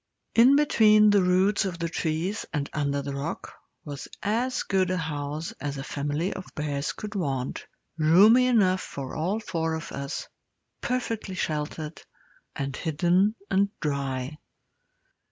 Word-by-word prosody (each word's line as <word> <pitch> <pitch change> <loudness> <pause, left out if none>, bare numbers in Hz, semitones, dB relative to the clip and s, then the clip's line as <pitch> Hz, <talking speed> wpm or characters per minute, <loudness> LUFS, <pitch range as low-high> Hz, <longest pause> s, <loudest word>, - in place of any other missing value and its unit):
In 245 +4 +7
between 215 -7 +5
the 205 -1 +5
roots 185 +4 +3
of 185 -4 -3
the 170 0 -2
trees 165 +5 -2
and 145 -3 -2
under 140 -1 -1
the 140 0 -4
rock 140 +4 -5 0.3
was 145 -2 -6 0.2
as 235 +5 0
good 190 -2 +1
a 185 - 0
house 150 -1 -3
as 145 -1 -3
a 135 - -4
family 145 +5 -2
of 190 - -8
bears 145 -1 -2
could 210 -1 -7
want 135 -9 -3 0.3
roomy 205 +11 +6
enough 190 -7 +3
for 135 -2 -6
all 185 +8 -1
four 165 -6 -2
of 160 +1 -6
us, 140 0 -5 0.5
perfectly 230 -6 -2
sheltered, 155 -1 -3 0.5
and 135 0 -3
hidden 175 +6 +2 0.2
and 200 +1 +3
dry. 140 -1 -2
165 Hz, 140 wpm, -26 LUFS, 145-200 Hz, 0.5 s, In